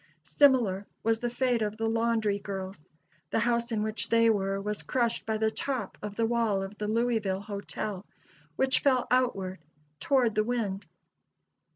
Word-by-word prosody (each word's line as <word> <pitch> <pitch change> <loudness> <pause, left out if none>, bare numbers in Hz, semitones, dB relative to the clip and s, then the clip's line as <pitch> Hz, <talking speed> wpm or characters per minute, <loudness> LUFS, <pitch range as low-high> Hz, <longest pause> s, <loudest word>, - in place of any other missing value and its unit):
Similar 235 -9 +3 0.2
was 225 0 +2
the 240 - -1
fate 245 -1 +1
of 210 0 -2
the 225 - -1
laundry 225 -2 +1
girls. 190 -5 -7 0.4
The - - 0
house 235 0 +1
in 215 -2 0
which 215 -2 -1
they 230 0 +5
were 195 -2 0
was 210 +1 -3
crushed 235 -3 -1
by 220 -1 0
the 220 0 +1
top 250 -5 -3
of 210 -1 -6
the 230 - +1
wall 225 -4 +1
of 195 +2 -7
the 210 - -2
Louisville 220 -4 0
Hotel, 205 -1 -5 0.5
which 265 +6 +2
fell 260 -3 +2
outward, 195 -8 +1 0.4
toward 255 -5 +2
the 215 - +2
wind. 215 -4 -2
220 Hz, 165 wpm, -29 LUFS, 200-235 Hz, 0.5 s, they